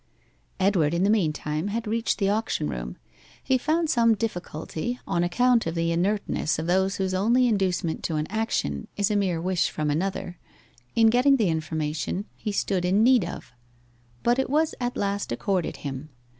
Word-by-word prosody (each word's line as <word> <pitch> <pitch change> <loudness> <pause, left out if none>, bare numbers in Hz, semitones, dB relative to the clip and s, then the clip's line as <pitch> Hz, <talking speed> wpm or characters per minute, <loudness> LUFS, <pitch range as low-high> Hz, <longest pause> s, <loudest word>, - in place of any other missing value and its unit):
Edward 175 -5 +2
in 175 - +1
the 200 - +4
meantime 155 -4 0
had 225 +3 -2
reached 225 +2 0
the 195 - +1
auction 205 -7 0
room. - - -5 0.5
He 260 -1 +2
found 320 +5 +1
some 230 -5 +4
difficulty, 200 +2 -4
on 170 - 0
account 240 +5 +2
of 165 - -3
the 165 0 0
inertness 185 -1 0
of 160 - -3
those 190 +3 +2
whose 190 -1 -1
only 230 +7 +3
inducement 185 -6 0
to 160 - -1
an 150 0 0
action 205 - -2
is 205 +1 +1
a - - +1
mere 190 -5 +1
wish 180 +1 0
from 150 -1 -2
another, 175 +2 -3 0.6
in 225 -1 +5
getting 255 +4 +5
the 220 -8 +2
information 160 +3 -2
he 215 - -4
stood 195 -2 0
in 190 +4 +3
need 250 -3 +5
of, 170 -6 -7 0.7
but 240 +2 +3
it 265 - 0
was 310 +3 +2
at 245 0 -2
last 200 -4 -2
accorded 180 +8 -1
him. 140 +2 -5
195 Hz, 175 wpm, -25 LUFS, 165-225 Hz, 0.7 s, in